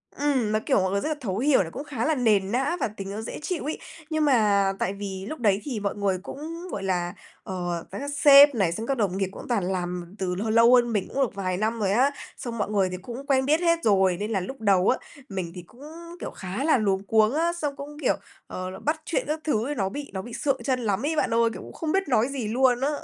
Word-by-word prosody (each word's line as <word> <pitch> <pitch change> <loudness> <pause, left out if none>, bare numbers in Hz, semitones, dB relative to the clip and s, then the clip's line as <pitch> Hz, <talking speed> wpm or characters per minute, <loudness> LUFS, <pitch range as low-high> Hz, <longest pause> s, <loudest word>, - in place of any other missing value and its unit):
Ừm, 270 -6 +1
nó 215 - +2
kiểu, - - +3
mọi 185 0 0
người 200 - 0
rất 305 - -2
là 310 - -1
thấu 195 -6 -2
hiểu 270 +2 +4
này, 165 - -8
cũng 275 - -6
khá 260 -6 -3
là 315 - +2
nền 210 -6 +2
nã 270 +8 0
và - - +1
tính 195 -2 -7
nó 210 +2 -4
dễ 225 - -6
chịu 350 +2 -3
ấy. 305 - -2 0.3
Nhưng 315 -1 +1
mà 205 -7 +3
tại 190 - 0
vì 195 -1 -6
lúc 310 - -6
đấy 205 -4 +2
thì 255 -7 -3
mọi 200 -1 -2
người 200 -2 0
cũng, 330 - -7
gọi 195 - -4
là, 175 -2 -1 0.3
ờ, 175 -2 -4
và - - -5
các 285 +1 -4
sếp 285 -1 +8
này, 195 -7 +2
xong 220 +7 -4
các 275 - 0
đồng 195 -4 0
nghiệp 195 -1 0
cũng - - -10
toàn 230 -6 +1
làm 180 0 -4
từ 180 -1 -1
h 220 - -2
lâu 230 +3 +6
hơn 240 -1 +3
mình 205 -3 0
cũng 275 - 0
được 235 - -3
vài 185 -2 -2
năm 220 +3 -1
rồi 200 -3 +1
á, 255 +7 +3 0.3
xong 235 -2 -5
mọi 205 - -1
người 195 -3 +2
thì 185 - -5
cũng 240 +8 -8
quen 265 -2 +3
biết 305 +3 +3
hết 335 -1 +3
rồi 190 -4 +3
nên 210 +2 -3
là 200 - +1
lúc 260 +8 -7
đầu 195 -3 +3
á, 260 - +3 0.3
mình 185 -4 -4
thì 180 - -6
cũng, 225 +9 -19 0.4
kiểu, - - -5
khá 190 +7 -5
là 310 -2 +4
luống 195 -3 0
cuống 215 +2 +3
á, 335 +3 +1
xong 295 -5 -3
cũng, 290 +1 -9
kiểu, - - +2 0.3
ờ, 185 0 -5
là 185 - -8
bắt 315 +2 -1
chuyện - - 0
các 305 +2 -1
thứ 235 -6 0
ấy 295 - -2
nó 195 -5 0
bị 285 +7 -7
nó 190 - -3
bị 240 +3 -10
sượng 275 0 -1
trân 260 -2 0
lắm 220 +1 -1
ấy 320 +2 0
bạn 270 - +1
ơi, 230 0 +4
kiểu, - - -8
cũng - - -11
không 320 -2 -3
biết 385 +2 +1
nói 245 -3 +3
gì 270 -5 -4
luôn 245 +2 +2
á. 275 - +2
225 Hz, 280 wpm, -25 LUFS, 195-280 Hz, 0.4 s, sếp